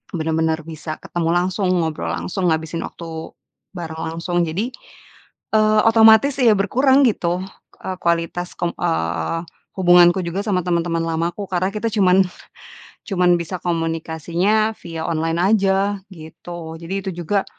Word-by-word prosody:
benar-benar 160 Hz, 0 st, 0 dB
bisa 155 Hz, -1 st, -6 dB
ketemu 165 Hz, -1 st, -2 dB
langsung, 185 Hz, +2 st, 0 dB
ngobrol 160 Hz, -, -1 dB
langsung, 90 Hz, -, -2 dB
ngabisin 160 Hz, +1 st, -3 dB
waktu 165 Hz, -1 st, -8 dB, 0.4 s
bareng 160 Hz, -2 st, -6 dB
langsung. 175 Hz, +1 st, -1 dB
Jadi, 200 Hz, +10 st, -2 dB, 0.9 s
eee, 215 Hz, 0 st, +4 dB
otomatis 225 Hz, +5 st, +6 dB
ya 235 Hz, -4 st, +6 dB
berkurang 260 Hz, +7 st, +3 dB
gitu, 180 Hz, -4 st, 0 dB, 0.4 s
eee, 185 Hz, -1 st, -4 dB
kualitas 170 Hz, +1 st, -1 dB
kom 175 Hz, -, -1 dB
eee, 80 Hz, -, -1 dB, 0.4 s
hubunganku 175 Hz, 0 st, +6 dB
juga 170 Hz, +3 st, -3 dB
sama 185 Hz, -4 st, +1 dB
teman-teman 170 Hz, -1 st, 0 dB
lamaku, 165 Hz, +4 st, -2 dB
karena 185 Hz, +1 st, +1 dB
kita 220 Hz, +2 st, -1 dB
cuman 190 Hz, -3 st, +4 dB, 0.9 s
cuman 180 Hz, -3 st, +2 dB
bisa 170 Hz, +2 st, -4 dB
komunikasinya 170 Hz, +5 st, 0 dB
via 165 Hz, -2 st, -6 dB
online 165 Hz, 0 st, -1 dB, 0.2 s
aja, 195 Hz, +1 st, +1 dB, 0.2 s
gitu. 160 Hz, 0 st, -9 dB
Jadi, 170 Hz, +3 st, -5 dB
itu 190 Hz, -, -2 dB
juga, 200 Hz, +4 st, +1 dB
175 Hz, 130 wpm, -20 LUFS, 165-195 Hz, 0.9 s, otomatis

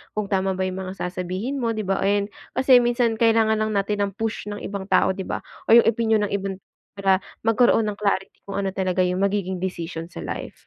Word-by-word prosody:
kung 210 Hz, -1 st, -1 dB
tama 190 Hz, -1 st, +1 dB
ba 190 Hz, -, -1 dB
yung 185 Hz, 0 st, -4 dB
mga 185 Hz, -, -6 dB
sasabihin 185 Hz, +9 st, -3 dB
mo, 230 Hz, -2 st, -1 dB
'di 215 Hz, -, -2 dB
ba, 195 Hz, -, +1 dB
and 200 Hz, +1 st, +1 dB, 0.2 s
kasi 260 Hz, -1 st, +6 dB
minsan 240 Hz, -1 st, +1 dB
kailangan 225 Hz, -1 st, +3 dB
lang 215 Hz, 0 st, 0 dB
natin 200 Hz, 0 st, 0 dB
ang -, -, -7 dB
push 225 Hz, -1 st, -3 dB
ng 205 Hz, 0 st, -5 dB
ibang 195 Hz, -1 st, -5 dB
tao, 190 Hz, -, +3 dB
'di 190 Hz, 0 st, -5 dB
ba, -, -, -4 dB, 0.2 s
o 225 Hz, -, +7 dB
yung 235 Hz, -, +7 dB
opinyon 220 Hz, -1 st, +1 dB
ng -, -, -11 dB
iban 195 Hz, -1 st, -3 dB, 0.4 s
para 195 Hz, -1 st, +2 dB, 0.2 s
magkaroon 225 Hz, +1 st, +4 dB
ng 205 Hz, -1 st, -4 dB
clarity 200 Hz, -2 st, -1 dB
kung 200 Hz, -, -4 dB
ano 195 Hz, -, -1 dB
talaga 185 Hz, -1 st, 0 dB
yung 180 Hz, 0 st, 0 dB
magiging 195 Hz, -2 st, -1 dB
desisyon 170 Hz, -2 st, -4 dB
sa -, -, -9 dB
life. -, -, -7 dB
200 Hz, 220 wpm, -23 LUFS, 190-220 Hz, 0.4 s, o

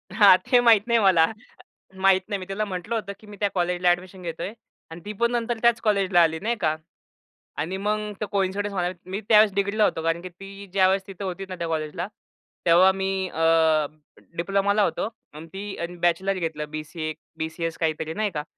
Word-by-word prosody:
हां, 200 Hz, -4 st, +8 dB
ते 250 Hz, -, +3 dB
माहीत 230 Hz, -4 st, +6 dB
नाही 235 Hz, -1 st, +3 dB
मला. 185 Hz, -5 st, +5 dB, 0.8 s
माहीत 190 Hz, -1 st, +6 dB
नाही. 205 Hz, -, -1 dB
मी 185 Hz, -, -7 dB
तिला 195 Hz, +2 st, -2 dB
म्हटलं 195 Hz, +2 st, -4 dB
होतं 210 Hz, -3 st, -3 dB
की 215 Hz, -, -16 dB
मी 210 Hz, -1 st, -11 dB
त्या 205 Hz, -, +2 dB
कॉलेजला 180 Hz, 0 st, +1 dB
एडमिशन 185 Hz, +1 st, -6 dB
घेतोय 170 Hz, +3 st, -5 dB, 0.4 s
आणि 165 Hz, +1 st, -9 dB
ती 210 Hz, -, -5 dB
पण 235 Hz, 0 st, +3 dB
नंतर 240 Hz, -1 st, -1 dB
त्याच 235 Hz, -1 st, +4 dB
कॉलेजला 195 Hz, -4 st, +2 dB
आली 160 Hz, -1 st, +2 dB
नाही 235 Hz, +3 st, -1 dB
का 155 Hz, -2 st, +1 dB, 0.9 s
आणि 170 Hz, +6 st, -2 dB
मग 210 Hz, +1 st, -2 dB
तो -, -, 0 dB
कोइन्सिडन्स 200 Hz, +1 st, -1 dB
म्हणा, 180 Hz, -2 st, 0 dB, 0.2 s
मी 190 Hz, +3 st, -4 dB
त्यावेळेस 215 Hz, -2 st, +6 dB
डिग्रीला 200 Hz, +2 st, +1 dB
होतो. 165 Hz, -, +1 dB
कारण 165 Hz, +1 st, 0 dB
की 185 Hz, -, -7 dB
ती 195 Hz, +3 st, -11 dB
ज्यावेळेस 190 Hz, 0 st, +3 dB
तिथं 195 Hz, 0 st, -8 dB
होती 190 Hz, +1 st, -4 dB
ना 185 Hz, -, -5 dB
त्या 170 Hz, -2 st, -4 dB
कॉलेजला, 155 Hz, +2 st, -3 dB, 0.6 s
तेव्हा 175 Hz, +3 st, +6 dB
मी 190 Hz, 0 st, -2 dB, 0.2 s
अ, 160 Hz, -, -5 dB, 1.0 s
डिप्लोमाला 200 Hz, +3 st, +1 dB
होतो 200 Hz, -, -1 dB, 0.3 s
आणि 155 Hz, +2 st, -10 dB
ती 200 Hz, +1 st, -6 dB
आणि 170 Hz, +1 st, -4 dB
बॅचलर 175 Hz, +3 st, +2 dB
घेतलं 155 Hz, -3 st, -3 dB
बी-सी-ए, 155 Hz, +1 st, -5 dB, 0.2 s
बी-सी-एस 160 Hz, +1 st, -4 dB
काहीतरी 160 Hz, 0 st, -2 dB
नाही 210 Hz, +2 st, -1 dB
का? 150 Hz, -, -2 dB
190 Hz, 190 wpm, -24 LUFS, 170-205 Hz, 1.0 s, हां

